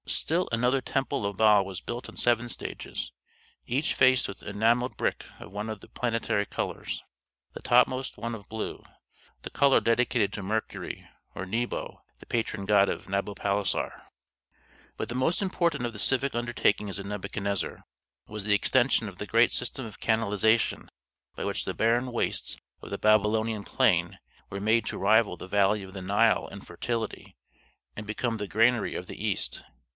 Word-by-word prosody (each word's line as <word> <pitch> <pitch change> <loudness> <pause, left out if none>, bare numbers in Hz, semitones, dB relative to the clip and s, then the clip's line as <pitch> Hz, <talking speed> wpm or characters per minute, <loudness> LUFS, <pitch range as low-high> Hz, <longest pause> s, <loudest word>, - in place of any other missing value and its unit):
Still 175 +3 0
another 125 +3 +2
temple 135 -6 -1
of 100 -1 -5
Bel 105 -2 +6
was 95 -2 -6
built 120 +4 -6
in - - -12
seven 120 0 +3
stages, - - -5 0.6
each 135 +5 +1
faced 130 -1 +4
with 100 - -8
enamelled 115 +5 +1
brick - - -1
of 85 - -11
one 105 +2 -4
of 110 -2 -5
the - - -14
planetary 115 -4 -1
colors; - - -4 0.5
the - - -8
topmost 130 +2 +3
one 115 0 -4
of 105 -3 -9
blue, 110 0 -5 0.6
the - - -6
color 140 -1 +5
dedicated 115 -2 +2
to 100 - -5
Mercury 110 +3 -3 0.3
or 95 - -4
Nebo, 115 +6 -3 0.2
the - - -13
patron 110 -3 -2
god 100 -1 +5
of - - -4
Nabopolassar. 100 0 -1 1.0
But - - -3
the 120 - -5
most 130 +7 +1
important 170 -8 0
of 120 - -3
the 105 - -8
civic 135 +4 +1
undertakings 115 -4 0
of 100 - -6
Nebuchadnezzar 100 -1 -3 0.4
was 105 -1 -6
the 105 0 +3
extension 120 +1 +3
of 95 -2 -9
the 105 - -5
great 115 +1 +4
system 125 +1 -2
of 110 - -10
canalization 110 0 +2 0.5
by - - -4
which - - -1
the - - -4
barren 120 +3 +2
wastes 120 - -1 0.2
of - - -9
the - - -3
Babylonian 110 0 +2
plain - - +2 0.3
were 100 - -5
made 110 +2 +2
to - - -3
rival 105 -1 +3
the 95 - -8
valley 100 +1 +2
of 95 0 -10
the 95 - -6
Nile 100 +5 +3
in 100 - -9
fertility, 110 +7 -4 0.6
and 105 0 -7
become 115 +2 -1
the 105 -1 -4
granary 115 +5 +2
of - - -4
the - - -8
East. - - -1
110 Hz, 170 wpm, -28 LUFS, 100-120 Hz, 1.0 s, Bel